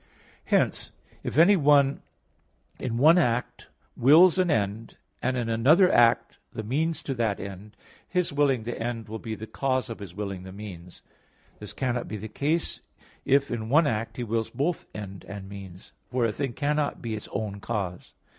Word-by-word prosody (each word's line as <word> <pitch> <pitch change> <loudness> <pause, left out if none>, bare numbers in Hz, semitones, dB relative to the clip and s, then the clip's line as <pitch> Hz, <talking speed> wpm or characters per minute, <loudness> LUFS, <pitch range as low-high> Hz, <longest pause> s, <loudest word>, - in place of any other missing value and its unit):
Hence, - - +1 0.3
if - - -4
anyone 150 -6 +5 0.8
in 115 -2 -2
one 160 +7 +6
act 120 -6 -1 0.3
wills 165 +8 +6
an 180 -1 +2
end, 110 -4 -1 0.2
and 130 +1 0
in 120 -2 -1
another 145 - +5
act 115 -1 +3
the 110 - -5
means 155 +9 -1
to 135 - -2
that 115 -5 -1
end, 100 +2 -9 0.3
his 180 -4 0
willing 140 -5 +2
the 120 +1 -5
end 115 -1 -3
will 110 +1 -6
be 110 -1 -5
the 110 - -7
cause 130 +1 -1
of 115 - -7
his 95 -4 -9
willing 100 -2 -4
the 95 0 -9
means. 95 -3 -10 0.6
This 105 - -7
cannot 125 -2 -2
be 110 - -5
the 110 +2 -6
case 150 +9 -1 0.4
if 140 +1 +3
in 110 -2 -3
one 155 +5 +5
act 115 -3 -2
he 125 - -2
wills 115 -1 -1
both 145 +8 -2
end 100 -2 -7
and 100 -1 -8
means; 95 -2 -11 0.2
for 125 -1 +1
a 115 - +1
thing 135 -1 -3
cannot 145 +1 -1
be 115 -2 -3
its 105 - -6
own 100 -2 -3
cause. 95 -3 -4
115 Hz, 175 wpm, -26 LUFS, 105-140 Hz, 0.8 s, one